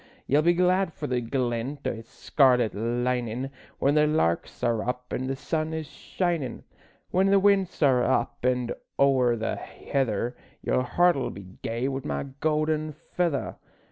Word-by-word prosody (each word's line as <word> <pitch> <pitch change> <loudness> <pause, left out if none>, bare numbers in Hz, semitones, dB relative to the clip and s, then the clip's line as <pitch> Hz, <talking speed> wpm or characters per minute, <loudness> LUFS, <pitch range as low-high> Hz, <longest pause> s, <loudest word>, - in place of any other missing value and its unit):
Ye'll 145 +3 +3
be 170 +2 +4
glad 180 0 +2
for 150 - -5
the 125 -3 0
glint 125 +3 -2
o' - - +1
its 115 0 -9
scarlet 125 -5 +3
linin' 120 +3 -1 0.3
When 140 - +2
the 150 0 +4
larks 150 - 0
are 115 -2 +2
up 125 +1 -4
an' 130 - -2
the 135 - -1
sun 155 +3 -2
is 160 -1 -3
shinin'; 165 -3 -3 0.5
When 190 +2 +3
the 200 0 +5
winds 195 -4 +2
are 130 -3 +4
up 120 -2 +1
an' 125 -1 +1 0.3
ower 130 -3 +4
the 110 0 -2
heather 120 -3 -2 0.3
Your - - +2
heart'll 140 0 +2
be 95 -1 -11
gay 115 +3 -2
wi' 135 0 -2
my 70 -1 -2 0.2
gowden 155 0 0 0.2
feather. 170 -6 -1
135 Hz, 160 wpm, -26 LUFS, 120-155 Hz, 0.5 s, the